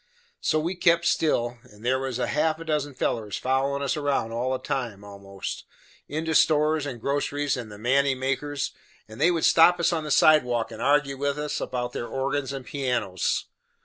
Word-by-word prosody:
So 155 Hz, -, +1 dB
we 170 Hz, +4 st, -1 dB
kep' 170 Hz, -1 st, +3 dB
still, 120 Hz, -6 st, +1 dB
and 110 Hz, -3 st, -16 dB
there 130 Hz, +1 st, +2 dB
was 130 Hz, -2 st, -3 dB
half 155 Hz, +5 st, 0 dB
a 165 Hz, -, -9 dB
dozen 150 Hz, -3 st, -1 dB
fellers 110 Hz, -5 st, -2 dB
follerin' 135 Hz, +2 st, 0 dB
us 140 Hz, -, 0 dB
round 140 Hz, -6 st, -1 dB
all 125 Hz, +3 st, -1 dB
the 130 Hz, -, 0 dB
time 115 Hz, -7 st, -4 dB
a 100 Hz, -1 st, -11 dB
most, 100 Hz, -1 st, -6 dB, 0.4 s
into 160 Hz, +2 st, -2 dB
stores 155 Hz, -1 st, +3 dB
and 125 Hz, -4 st, -6 dB
groceries 145 Hz, +2 st, -1 dB
and 120 Hz, -4 st, -7 dB
the 105 Hz, -, -9 dB
manty 130 Hz, +4 st, +2 dB
makers, 135 Hz, +2 st, -2 dB, 0.4 s
and 110 Hz, +1 st, -10 dB
they 170 Hz, -, +5 dB
would 170 Hz, -2 st, +1 dB
stop 170 Hz, +1 st, +6 dB
us 170 Hz, -, +2 dB
on 160 Hz, -2 st, -1 dB
the 150 Hz, -, -5 dB
sidewalk 125 Hz, -7 st, +4 dB
and 110 Hz, -, -8 dB
argue 140 Hz, -1 st, +2 dB
with 140 Hz, +1 st, -1 dB
us 150 Hz, 0 st, -3 dB
about 125 Hz, -1 st, -3 dB
their 120 Hz, -, -4 dB
organs 135 Hz, +1 st, -2 dB
and 135 Hz, -2 st, -6 dB
pianos. 125 Hz, -, -1 dB
140 Hz, 190 wpm, -25 LUFS, 125-150 Hz, 0.4 s, stop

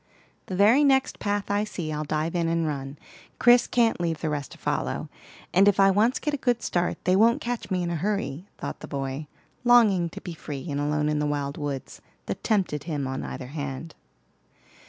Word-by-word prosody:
"The 185 Hz, -, -4 dB
very 220 Hz, +9 st, +5 dB
next 270 Hz, -2 st, +2 dB
path 205 Hz, 0 st, -1 dB
I 205 Hz, +1 st, +2 dB
see, 170 Hz, -7 st, -4 dB
I'll 150 Hz, 0 st, -2 dB
dive 155 Hz, +2 st, -1 dB
in 170 Hz, -1 st, +1 dB
and 165 Hz, 0 st, +1 dB
run; 140 Hz, -2 st, -4 dB, 0.4 s
Chris 240 Hz, 0 st, +6 dB
can't 230 Hz, -6 st, +2 dB
leave 165 Hz, -3 st, -1 dB
the 155 Hz, -, -2 dB
rest 145 Hz, -2 st, -3 dB
to -, -, -13 dB
follow, -, -, -2 dB, 0.4 s
and 195 Hz, +3 st, +5 dB
if 200 Hz, -1 st, +4 dB
I 195 Hz, 0 st, +6 dB
once 220 Hz, +6 st, +3 dB
get 300 Hz, -, -2 dB
a -, -, 0 dB
good 245 Hz, -3 st, 0 dB
start, 175 Hz, 0 st, 0 dB
they 185 Hz, -, +4 dB
won't 230 Hz, +4 st, +4 dB
catch 240 Hz, -1 st, -4 dB
me 185 Hz, -2 st, 0 dB
in 170 Hz, -, -2 dB
a -, -, -1 dB
hurry," 185 Hz, -2 st, -2 dB
thought -, -, -5 dB
the -, -, -9 dB
boy, 135 Hz, +1 st, -4 dB, 0.4 s
longing 215 Hz, -8 st, +5 dB
to -, -, -8 dB
be 175 Hz, -, -7 dB
free 145 Hz, -4 st, -7 dB
and 140 Hz, 0 st, -1 dB
alone 150 Hz, +1 st, 0 dB
in 150 Hz, 0 st, +1 dB
the 150 Hz, -, 0 dB
wild 145 Hz, -1 st, -2 dB
woods 145 Hz, -3 st, -5 dB, 0.2 s
that -, -, -5 dB
tempted 185 Hz, -9 st, 0 dB
him 150 Hz, -5 st, -2 dB
on 130 Hz, 0 st, -3 dB
either 130 Hz, -1 st, -6 dB
hand. 145 Hz, +1 st, -5 dB
170 Hz, 210 wpm, -26 LUFS, 150-205 Hz, 0.4 s, Chris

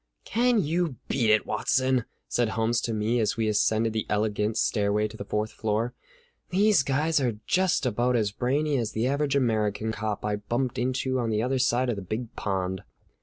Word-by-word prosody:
"Can 240 Hz, -2 st, +2 dB
you 165 Hz, -1 st, 0 dB
beat 120 Hz, -5 st, +1 dB
it, 110 Hz, 0 st, +4 dB
Watson?" 130 Hz, +3 st, +1 dB, 0.2 s
said 120 Hz, -2 st, +1 dB
Holmes 115 Hz, +2 st, 0 dB
to 115 Hz, -, -2 dB
me 110 Hz, +2 st, 0 dB
as 110 Hz, 0 st, 0 dB
we 110 Hz, -1 st, +1 dB
ascended 110 Hz, +1 st, +2 dB
the 110 Hz, -1 st, -2 dB
elegant 105 Hz, +1 st, 0 dB
stairway 105 Hz, 0 st, +1 dB
to 110 Hz, -, -12 dB
the 105 Hz, -, -6 dB
fourth 105 Hz, +1 st, -2 dB
floor. 110 Hz, +2 st, -1 dB, 0.6 s
"These 200 Hz, -1 st, +4 dB
guys 145 Hz, +4 st, +1 dB
are 120 Hz, -5 st, 0 dB
just 185 Hz, -5 st, +2 dB
about 125 Hz, +1 st, +1 dB
as 105 Hz, -3 st, +1 dB
brainy 140 Hz, +6 st, 0 dB
as 115 Hz, -2 st, -3 dB
the 110 Hz, +2 st, 0 dB
average 140 Hz, +1 st, 0 dB
American 110 Hz, -4 st, +1 dB
cop 110 Hz, -2 st, -3 dB
I 105 Hz, -1 st, 0 dB
bumped 120 Hz, +5 st, -2 dB
into 130 Hz, +1 st, 0 dB
on 115 Hz, -2 st, -1 dB
the 110 Hz, 0 st, 0 dB
other 130 Hz, +1 st, 0 dB
side 125 Hz, 0 st, +2 dB
of 120 Hz, -4 st, -1 dB
the -, -, -4 dB
Big 110 Hz, +5 st, -5 dB
Pond." 95 Hz, -1 st, -2 dB
115 Hz, 190 wpm, -27 LUFS, 105-130 Hz, 0.6 s, it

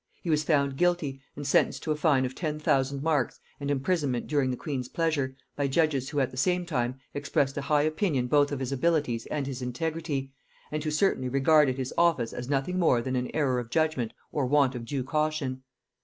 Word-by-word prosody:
He 170 Hz, -, -1 dB
was 155 Hz, 0 st, +2 dB
found 140 Hz, -3 st, +1 dB
guilty, 170 Hz, -6 st, +1 dB
and 145 Hz, -, -6 dB
sentenced 140 Hz, -, +2 dB
to 155 Hz, -, -1 dB
a -, -, +2 dB
fine 150 Hz, -4 st, +3 dB
of 125 Hz, -, -4 dB
ten 150 Hz, 0 st, -3 dB
thousand 135 Hz, -2 st, +1 dB
marks 150 Hz, -5 st, 0 dB, 0.2 s
and 140 Hz, 0 st, -3 dB
imprisonment 140 Hz, -3 st, 0 dB
during 145 Hz, -3 st, +1 dB
the 125 Hz, -, -2 dB
queen's 130 Hz, -5 st, -4 dB
pleasure, 150 Hz, -6 st, 0 dB, 0.2 s
by 140 Hz, -1 st, 0 dB
judges 140 Hz, -2 st, +1 dB
who 145 Hz, -, -1 dB
at 130 Hz, -, +1 dB
the 130 Hz, -, -10 dB
same 180 Hz, +5 st, +1 dB
time 130 Hz, -6 st, -1 dB, 0.2 s
expressed 140 Hz, -1 st, 0 dB
a 145 Hz, -, -2 dB
high 145 Hz, +1 st, +2 dB
opinion 155 Hz, -4 st, 0 dB
both 145 Hz, +3 st, +3 dB
of 140 Hz, -, -2 dB
his 130 Hz, 0 st, -3 dB
abilities 135 Hz, -5 st, 0 dB
and 145 Hz, -2 st, -2 dB
his 135 Hz, -1 st, -5 dB
integrity, 140 Hz, +1 st, -3 dB, 0.4 s
and 150 Hz, 0 st, -2 dB
who 155 Hz, -, -1 dB
certainly 150 Hz, -5 st, +1 dB
regarded 140 Hz, 0 st, +4 dB
his 130 Hz, -1 st, -3 dB
offence 165 Hz, -9 st, +2 dB
as 125 Hz, +1 st, -6 dB
nothing 145 Hz, +6 st, 0 dB
more 160 Hz, -8 st, +4 dB
than 130 Hz, +2 st, -2 dB
an 125 Hz, 0 st, -1 dB
error 135 Hz, -5 st, +2 dB
of 120 Hz, -2 st, -6 dB
judgement 155 Hz, -5 st, 0 dB, 0.2 s
or 140 Hz, -4 st, 0 dB
want 140 Hz, -1 st, +3 dB
of 120 Hz, -2 st, -6 dB
due 135 Hz, +1 st, -2 dB
caution. 150 Hz, -2 st, -1 dB
140 Hz, 210 wpm, -28 LUFS, 130-155 Hz, 0.4 s, regarded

